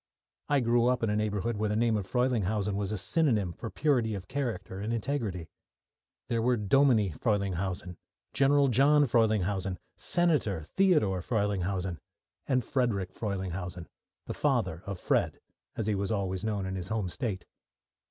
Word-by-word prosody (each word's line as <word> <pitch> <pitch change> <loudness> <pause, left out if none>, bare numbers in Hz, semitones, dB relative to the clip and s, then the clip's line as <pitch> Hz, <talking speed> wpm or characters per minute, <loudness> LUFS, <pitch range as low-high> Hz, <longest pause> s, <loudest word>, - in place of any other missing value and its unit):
I 145 -2 +3
grew 120 0 +3
up 125 -1 +1
in 110 - +1
a - - 0
neighbourhood 105 +1 -1
where 105 0 0
the 105 - 0
name 115 0 +2
of 100 -3 -2
Frelinghuysen 105 -3 0
was 100 0 -2
a 105 - -1
synonym 105 - +1
for 115 - -6
purity 125 -8 +1
of 95 -2 -7
character 110 -9 -3
and 105 +3 -3
integrity. 115 - -2 0.8
There 115 -1 0
were 125 +1 +2
Dominie 110 -1 +3
Frelinghuysen, 95 - -2 0.4
General 140 +1 +4
John 145 +4 +5
Frelinghuysen, 105 -5 +1 0.2
Senator 145 - +1
Theodore 145 - +2
Frelinghuysen 95 -4 -1 0.5
and 130 -2 +2
Frederick 110 -9 -1
Frelinghuysen, 95 -4 -4 0.4
the - - -4
father 80 +2 0
of 100 -2 -4
"Fred," - - 0 0.4
as 110 - -2
he 110 - +1
was 100 +1 -1
always 95 -3 -1
called 105 -3 -1
in 95 - -3
his 90 -2 -4
home 110 -2 -1
state. 95 0 -4
105 Hz, 150 wpm, -29 LUFS, 95-120 Hz, 0.8 s, John